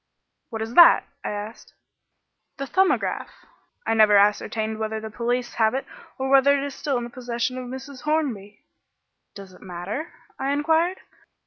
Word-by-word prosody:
"What 225 Hz, -2 st, -4 dB
is 225 Hz, +1 st, -7 dB
that?" 345 Hz, +4 st, +8 dB, 0.2 s
I -, -, -3 dB
asked. 210 Hz, +2 st, -7 dB, 0.8 s
"The 275 Hz, -, -4 dB
'Thumbograph.' 380 Hz, +7 st, 0 dB, 0.4 s
I -, -, +1 dB
never 215 Hz, -2 st, +6 dB
ascertained 215 Hz, +2 st, +1 dB
whether 220 Hz, 0 st, -2 dB
the 220 Hz, 0 st, -8 dB
police 240 Hz, +2 st, -2 dB
have 220 Hz, +1 st, +2 dB
it 270 Hz, -, -3 dB, 0.3 s
or 265 Hz, -, -2 dB
whether 275 Hz, +1 st, +5 dB
it 275 Hz, -, -2 dB
is 285 Hz, -, -5 dB
still 280 Hz, -2 st, -2 dB
in 240 Hz, -, -3 dB
the 240 Hz, -, -7 dB
possession 240 Hz, 0 st, -3 dB
of 250 Hz, -, -7 dB
Mrs. 265 Hz, +1 st, -8 dB
Hornby." 250 Hz, -10 st, -2 dB, 0.7 s
"Does 195 Hz, -2 st, -11 dB
it -, -, -17 dB
matter?" 190 Hz, -, -6 dB, 0.3 s
I 275 Hz, +1 st, 0 dB
inquired. 325 Hz, +5 st, +1 dB
240 Hz, 160 wpm, -24 LUFS, 220-275 Hz, 0.8 s, that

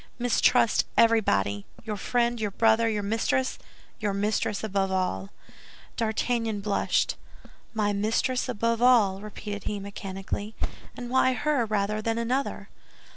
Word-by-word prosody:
Mistrust 245 Hz, -1 st, +3 dB
everybody, 100 Hz, -, +3 dB, 0.2 s
your 215 Hz, -2 st, -3 dB
friend, 235 Hz, +3 st, 0 dB
your 210 Hz, -, 0 dB
brother, 225 Hz, +2 st, +3 dB
your 210 Hz, -2 st, -1 dB
mistress—your 220 Hz, -1 st, -2 dB
mistress 210 Hz, 0 st, -1 dB
above 195 Hz, -2 st, 0 dB
all." 100 Hz, -, -1 dB, 0.7 s
D'Artagnan 225 Hz, -1 st, -1 dB
blushed. 200 Hz, 0 st, +1 dB, 0.6 s
"My 205 Hz, -1 st, +1 dB
mistress 225 Hz, +5 st, 0 dB
above 230 Hz, 0 st, 0 dB
all," 215 Hz, -6 st, +4 dB
repeated 205 Hz, -1 st, -7 dB
he, 205 Hz, -, -2 dB
mechanically; 200 Hz, +1 st, -5 dB, 0.4 s
"and 245 Hz, 0 st, -6 dB
why 260 Hz, 0 st, +4 dB
her 285 Hz, -3 st, 0 dB
rather 210 Hz, 0 st, 0 dB
than 225 Hz, +1 st, -1 dB
another?" 250 Hz, +4 st, -2 dB
215 Hz, 120 wpm, -27 LUFS, 200-235 Hz, 0.7 s, all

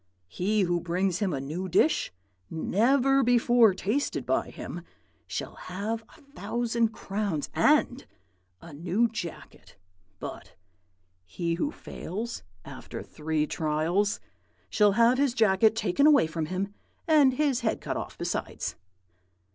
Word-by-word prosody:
He 210 Hz, -, 0 dB
who 175 Hz, -2 st, +1 dB
brings 180 Hz, +1 st, 0 dB
him 200 Hz, -3 st, 0 dB
a 140 Hz, -, -2 dB
new 160 Hz, +8 st, -4 dB
dish, 195 Hz, -, +2 dB, 0.4 s
never 260 Hz, -, +2 dB
before 240 Hz, -4 st, +4 dB
tasted 220 Hz, +10 st, -1 dB
by -, -, 0 dB
him, -, -, -7 dB, 0.5 s
shall -, -, -4 dB
have 210 Hz, +5 st, -4 dB
a -, -, -20 dB
thousand 240 Hz, -4 st, -1 dB
crowns 200 Hz, -7 st, -3 dB
and -, -, +2 dB, 0.6 s
a 170 Hz, -, -11 dB
new 180 Hz, +10 st, +1 dB
jacket; 210 Hz, -7 st, -8 dB, 0.4 s
but -, -, -8 dB, 0.7 s
he 170 Hz, -, -3 dB
who 285 Hz, -, -1 dB
fails, 225 Hz, -, -6 dB, 0.2 s
after -, -, -8 dB
three 155 Hz, 0 st, -2 dB
trials, 165 Hz, +7 st, 0 dB, 0.5 s
shall 210 Hz, -2 st, +4 dB
have 235 Hz, +4 st, +4 dB
his 275 Hz, -4 st, +2 dB
jacket 220 Hz, -1 st, +4 dB
taken 225 Hz, +6 st, +2 dB
away 285 Hz, -, +6 dB
from 160 Hz, 0 st, -3 dB
him, 195 Hz, +3 st, -3 dB, 0.3 s
and 290 Hz, -5 st, +5 dB
his 280 Hz, -3 st, +1 dB
head 220 Hz, -3 st, -1 dB
cut -, -, -4 dB
off -, -, -6 dB
besides.' -, -, -3 dB
210 Hz, 130 wpm, -27 LUFS, 175-240 Hz, 0.7 s, away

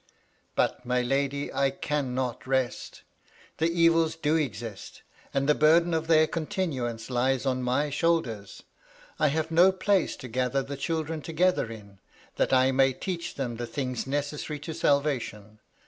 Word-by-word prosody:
" -, -, -39 dB
But, -, -, 0 dB
my 125 Hz, 0 st, 0 dB
lady, 140 Hz, +2 st, -1 dB
I 140 Hz, 0 st, +2 dB
cannot 130 Hz, -3 st, -3 dB
rest 130 Hz, -2 st, -2 dB, 0.6 s
The 160 Hz, +1 st, +2 dB
evils 165 Hz, -1 st, +3 dB
do 155 Hz, -1 st, 0 dB
exist, 115 Hz, -8 st, -4 dB, 0.3 s
and 140 Hz, 0 st, 0 dB
the 150 Hz, -, +6 dB
burden 165 Hz, +3 st, +4 dB
of 160 Hz, 0 st, -1 dB
their 155 Hz, -1 st, +5 dB
continuance 135 Hz, -9 st, -3 dB
lies 130 Hz, +2 st, +1 dB
on 130 Hz, -1 st, 0 dB
my 130 Hz, +4 st, 0 dB
shoulders. 140 Hz, -10 st, -1 dB, 0.6 s
I 150 Hz, -, +4 dB
have 160 Hz, +2 st, -1 dB
no 175 Hz, +4 st, +6 dB
place 190 Hz, -1 st, +1 dB
to 125 Hz, -, -9 dB
gather 125 Hz, +3 st, 0 dB
the 140 Hz, +1 st, -6 dB
children 160 Hz, +1 st, -3 dB
together 170 Hz, -5 st, +1 dB
in, 100 Hz, -3 st, -12 dB, 0.4 s
that -, -, +1 dB
I 130 Hz, 0 st, +4 dB
may 135 Hz, 0 st, +3 dB
teach 175 Hz, +4 st, -5 dB
them 120 Hz, -4 st, -3 dB
the 120 Hz, 0 st, -4 dB
things 130 Hz, -1 st, -3 dB
necessary 145 Hz, +2 st, -3 dB
to 160 Hz, +2 st, -5 dB
salvation. 125 Hz, -9 st, -1 dB
140 Hz, 155 wpm, -27 LUFS, 125-160 Hz, 0.6 s, the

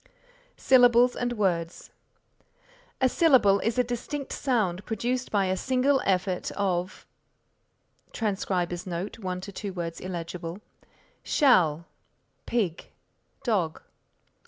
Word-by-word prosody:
SYLLABLES 245 Hz, -1 st, +5 dB
AND 245 Hz, 0 st, -2 dB
WORDS 175 Hz, -6 st, -2 dB, 1.1 s
A 260 Hz, -, +4 dB
syllable 255 Hz, -10 st, +4 dB
is 225 Hz, +3 st, -1 dB
a 250 Hz, -, +4 dB
distinct 245 Hz, +4 st, -5 dB
sound 210 Hz, -9 st, 0 dB
produced 240 Hz, +5 st, -2 dB
by 200 Hz, -2 st, +1 dB
a 185 Hz, 0 st, 0 dB
single 260 Hz, +6 st, +1 dB
effort 185 Hz, -1 st, 0 dB
of 185 Hz, -2 st, -2 dB, 1.1 s
[Transcriber's 185 Hz, -4 st, -2 dB
note: 180 Hz, +5 st, -5 dB
1 185 Hz, -3 st, -4 dB
2 200 Hz, +1 st, -6 dB
words 170 Hz, -2 st, -5 dB
illegible] 170 Hz, -1 st, -6 dB, 0.6 s
shall, 170 Hz, -, +3 dB, 0.6 s
pig, 195 Hz, -9 st, -1 dB, 0.5 s
dog. 185 Hz, -10 st, -1 dB
200 Hz, 100 wpm, -27 LUFS, 180-245 Hz, 1.1 s, SYLLABLES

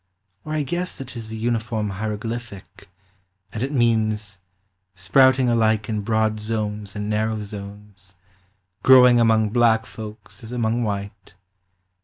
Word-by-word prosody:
Or 155 Hz, -, -5 dB
I 155 Hz, -1 st, 0 dB
guess 175 Hz, +4 st, -4 dB
it 130 Hz, -1 st, -8 dB
is 115 Hz, -2 st, -7 dB
a -, -, -5 dB
uniform 110 Hz, -2 st, -2 dB
hieroglyphic, 105 Hz, 0 st, -6 dB, 0.6 s
And 110 Hz, -, -4 dB
it 135 Hz, +3 st, -2 dB
means, 110 Hz, -5 st, 0 dB, 0.6 s
Sprouting 130 Hz, +7 st, +4 dB
alike 110 Hz, -2 st, +1 dB
in 105 Hz, -1 st, -1 dB
broad 110 Hz, 0 st, 0 dB
zones 105 Hz, -1 st, -4 dB
and 105 Hz, 0 st, -4 dB
narrow 110 Hz, 0 st, -1 dB
zones, 100 Hz, -1 st, -10 dB, 0.7 s
Growing 125 Hz, -1 st, +7 dB
among 110 Hz, -2 st, +3 dB
black 115 Hz, -1 st, +3 dB
folks 110 Hz, +3 st, -10 dB
as 110 Hz, -, -9 dB
among 120 Hz, -1 st, 0 dB
white. 100 Hz, -3 st, -5 dB
110 Hz, 130 wpm, -22 LUFS, 105-120 Hz, 0.7 s, Growing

